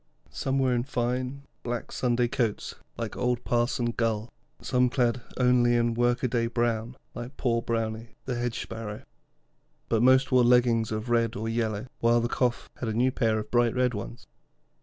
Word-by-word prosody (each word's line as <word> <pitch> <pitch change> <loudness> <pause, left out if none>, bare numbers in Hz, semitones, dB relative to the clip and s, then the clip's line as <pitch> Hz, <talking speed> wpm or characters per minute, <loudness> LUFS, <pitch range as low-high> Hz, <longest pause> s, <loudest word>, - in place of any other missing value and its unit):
Some 135 0 -1
were 130 -2 +2
in 120 - +1
fine, 125 +1 -2 0.2
black 120 -1 -4
Sunday 120 -1 +1
coats 120 -3 -1 0.2
like 115 -2 -4
old 125 -1 0
Parson 120 0 0
Gull, 115 -1 -1 0.3
some 125 -1 +2
clad 120 -1 +1 0.2
only 125 -1 +4
in 120 0 +2
work 120 +2 +1
a - - +3
day 115 -1 0
brown 115 0 -1 0.2
like 120 +3 -8
Poor 115 -2 +1
Brownie, 115 0 -3
the 130 - -2
Hedge 120 -1 -2
Sparrow; 110 -2 -7 0.9
but 115 -1 +2
most 130 +1 +5
wore 125 -1 +5
leggings 120 -2 +3
of 110 +2 -3
red 115 0 +2
or 110 0 -3
yellow, 110 -2 -1
while 115 0 +4
the 120 0 -2
Chough 125 -2 0
had 120 - -3
a - - -1
new 125 +4 +2
pair 110 -4 +1
of 105 0 -5
bright 120 -1 +3
red 125 -1 +2
ones. 110 +3 -7
120 Hz, 180 wpm, -27 LUFS, 115-125 Hz, 0.9 s, most